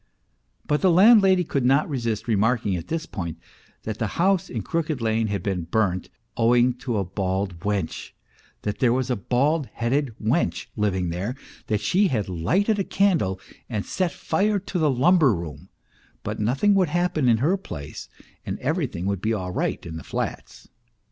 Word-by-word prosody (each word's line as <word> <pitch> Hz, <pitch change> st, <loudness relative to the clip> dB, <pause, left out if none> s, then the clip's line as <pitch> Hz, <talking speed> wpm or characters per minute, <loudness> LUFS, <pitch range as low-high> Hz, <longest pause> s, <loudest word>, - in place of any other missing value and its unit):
But 150 Hz, 0 st, 0 dB
the 190 Hz, -, +4 dB
landlady 190 Hz, 0 st, +6 dB
could 140 Hz, -5 st, -1 dB
not 135 Hz, +4 st, +3 dB
resist 115 Hz, -5 st, -2 dB
remarking 110 Hz, -2 st, +1 dB
at 85 Hz, -, -5 dB
this 165 Hz, 0 st, -2 dB
point 85 Hz, -, -5 dB, 0.5 s
that 110 Hz, 0 st, -5 dB
the 110 Hz, -, 0 dB
house 190 Hz, 0 st, +2 dB
in 110 Hz, -4 st, -4 dB
Crooked 155 Hz, -, -2 dB
Lane 110 Hz, -1 st, +1 dB
had 100 Hz, -3 st, -3 dB
been 95 Hz, -4 st, -2 dB
burnt 95 Hz, -4 st, 0 dB, 0.3 s
owing 120 Hz, +2 st, +4 dB
to 120 Hz, -4 st, -2 dB
a 100 Hz, -, +1 dB
bald 95 Hz, -1 st, -2 dB
wench; 100 Hz, -2 st, -2 dB, 0.5 s
that 105 Hz, -1 st, -3 dB
there 125 Hz, -3 st, +3 dB
was 130 Hz, +1 st, 0 dB
a -, -, +2 dB
bald 135 Hz, +7 st, +1 dB
headed 125 Hz, +1 st, -1 dB
wench 105 Hz, -, 0 dB
li 105 Hz, -1 st, +1 dB
ving 90 Hz, -2 st, -2 dB
there, 95 Hz, +9 st, -3 dB, 0.3 s
that 105 Hz, -1 st, 0 dB
she 200 Hz, +2 st, +3 dB
had 110 Hz, -, -1 dB
lighted 185 Hz, -, +1 dB
a -, -, +2 dB
candle 165 Hz, -, +1 dB, 0.3 s
and 105 Hz, -4 st, -3 dB
set 185 Hz, -3 st, -1 dB
fire 205 Hz, +6 st, 0 dB
to 190 Hz, -1 st, -4 dB
the 155 Hz, -2 st, +3 dB
lumber 140 Hz, -, +4 dB
room; 75 Hz, -4 st, -8 dB, 0.5 s
but -, -, -4 dB
nothing 135 Hz, -, +2 dB
would 190 Hz, -4 st, +3 dB
happen 175 Hz, -5 st, +1 dB
in 115 Hz, -, +4 dB
her 155 Hz, -, +2 dB
place, 75 Hz, -, -8 dB, 0.4 s
arid -, -, -3 dB
everything 135 Hz, -, -2 dB
would 100 Hz, -2 st, -1 dB
be 110 Hz, +2 st, 0 dB
all 90 Hz, -3 st, -4 dB
right -, -, -2 dB
in 80 Hz, -1 st, -6 dB
the -, -, -8 dB
flats. -, -, -5 dB
120 Hz, 180 wpm, -24 LUFS, 100-165 Hz, 0.5 s, landlady